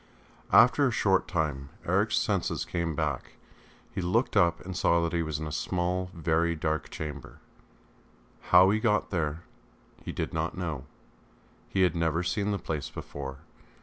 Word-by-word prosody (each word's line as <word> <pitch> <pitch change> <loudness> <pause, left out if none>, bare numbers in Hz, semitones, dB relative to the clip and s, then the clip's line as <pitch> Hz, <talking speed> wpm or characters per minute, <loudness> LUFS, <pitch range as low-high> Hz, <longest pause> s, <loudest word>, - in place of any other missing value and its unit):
After 125 +5 +6
a - - 0
short 95 -4 +2
time 75 -5 -2 0.2
Eric's - - +2
senses - - 0
came 85 -3 -2
back; 70 -3 -2 0.6
he 100 - -2
looked 110 +9 +1
up 85 -4 +4
and 95 0 -5
saw 85 -1 +3
that 85 - -1
he 85 - +1
was 80 -2 -2
in 80 - -5
a 75 - -5
small, 90 +3 -1
very 85 +1 +1
dark 80 -1 -2
chamber. 75 -3 -7 1.1
How 95 +2 +7
he 110 - +2
got 105 -2 +1
there 80 -2 -1 0.6
he - - -4
did - - -3
not - - -2
know, 80 -7 -4 0.8
he 95 - +2
had 90 - +2
never 85 +1 +1
seen 100 +3 -1
the 100 - 0
place 80 -5 -4
before. 65 -2 -7
85 Hz, 160 wpm, -28 LUFS, 80-95 Hz, 1.1 s, How